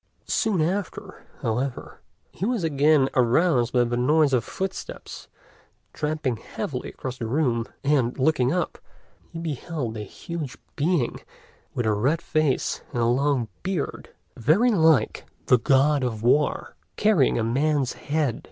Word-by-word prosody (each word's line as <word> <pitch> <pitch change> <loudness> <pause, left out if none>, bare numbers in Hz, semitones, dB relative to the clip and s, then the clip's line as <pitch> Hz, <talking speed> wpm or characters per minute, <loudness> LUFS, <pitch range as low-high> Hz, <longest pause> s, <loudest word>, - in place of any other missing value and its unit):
Soon 200 -7 +1
after, 185 +4 -4 0.2
however, 125 +3 -3 0.3
he - - -8
was 230 -3 0
again 145 -2 +3
aroused 125 0 +3
by 125 -1 +4
the 120 0 -1
noise 145 +4 +3
of 120 -3 +3
footsteps 190 +7 -6 0.7
tramping 150 -5 -2
heavily - - -5
across 130 -1 -7
the 115 - -3
room, 120 -3 0 0.2
and, 135 -4 +1
looking 130 -2 +2
up, 175 0 -2 0.5
he 170 - -8
beheld 150 -6 -4
a - - -5
huge 145 - -6 0.2
being 150 -4 0 0.6
with 120 - -1
a 110 - +2
red 135 +11 +1
face 155 -5 0
and 120 - 0
a - - +3
long 130 0 +1
beard, 185 -5 -3 0.3
very 175 - +3
like 160 - +3 0.2
the 125 - +5
God 140 +3 +3
of 115 -3 -3
War, 145 +5 +1 0.2
carrying 205 -11 +3
a 115 - 0
man's 135 +3 +1
head. 145 -5 -1
140 Hz, 140 wpm, -25 LUFS, 120-160 Hz, 0.7 s, the